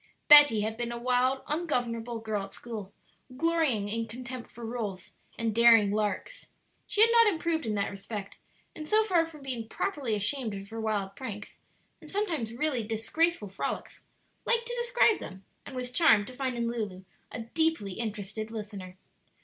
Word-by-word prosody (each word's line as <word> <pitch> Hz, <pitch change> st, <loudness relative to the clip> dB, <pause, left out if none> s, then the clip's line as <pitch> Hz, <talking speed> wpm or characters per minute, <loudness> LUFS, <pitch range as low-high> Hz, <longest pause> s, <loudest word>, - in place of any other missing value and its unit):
Betty 290 Hz, -7 st, +9 dB
had 220 Hz, +1 st, -2 dB
been 235 Hz, 0 st, -3 dB
a 235 Hz, -, -4 dB
wild, 255 Hz, +2 st, +1 dB
ungovernable 240 Hz, -8 st, -2 dB
girl 215 Hz, -3 st, -2 dB
at 195 Hz, -, -12 dB
school, 215 Hz, -5 st, -7 dB, 0.5 s
glorying 320 Hz, -10 st, +1 dB
in 225 Hz, +2 st, -3 dB
contempt 250 Hz, +1 st, -8 dB
for 235 Hz, +1 st, -9 dB
rules 225 Hz, -5 st, -5 dB, 0.2 s
and 225 Hz, -1 st, -1 dB
daring 230 Hz, -3 st, +6 dB
"larks." 215 Hz, -, -2 dB, 0.4 s
She 420 Hz, -, +2 dB
had 460 Hz, +1 st, +8 dB
not 465 Hz, -1 st, +6 dB
improved 325 Hz, -, 0 dB
in 215 Hz, -, -1 dB
that 200 Hz, -, -1 dB
respect, 200 Hz, 0 st, -7 dB, 0.4 s
and 305 Hz, -1 st, -7 dB
so 435 Hz, +4 st, +4 dB
far 350 Hz, -6 st, +2 dB
from 305 Hz, -3 st, -13 dB
being 245 Hz, -4 st, -4 dB
properly 285 Hz, -, -2 dB
ashamed 215 Hz, +1 st, -1 dB
of 195 Hz, 0 st, -8 dB
her 225 Hz, 0 st, -5 dB
wild 205 Hz, -3 st, -2 dB
pranks 210 Hz, -6 st, -8 dB, 0.4 s
and 310 Hz, -, -11 dB
sometimes 335 Hz, -, -1 dB
really 260 Hz, +1 st, -1 dB
disgraceful 225 Hz, -, 0 dB
frolics, 190 Hz, -, -5 dB, 0.4 s
liked 470 Hz, 0 st, +2 dB
to 485 Hz, 0 st, -4 dB
describe 475 Hz, -3 st, +3 dB
them, 190 Hz, 0 st, -10 dB, 0.2 s
and 270 Hz, -, -7 dB
was 250 Hz, -1 st, -4 dB
charmed 245 Hz, -8 st, +5 dB
to 255 Hz, -, -9 dB
find 255 Hz, -1 st, -3 dB
in 235 Hz, -, -1 dB
Lulu 210 Hz, -6 st, -4 dB, 0.3 s
a 235 Hz, -, -5 dB
deeply 320 Hz, -3 st, 0 dB
interested 215 Hz, +1 st, -5 dB
listener. 205 Hz, -4 st, -8 dB
235 Hz, 170 wpm, -29 LUFS, 215-305 Hz, 0.5 s, Betty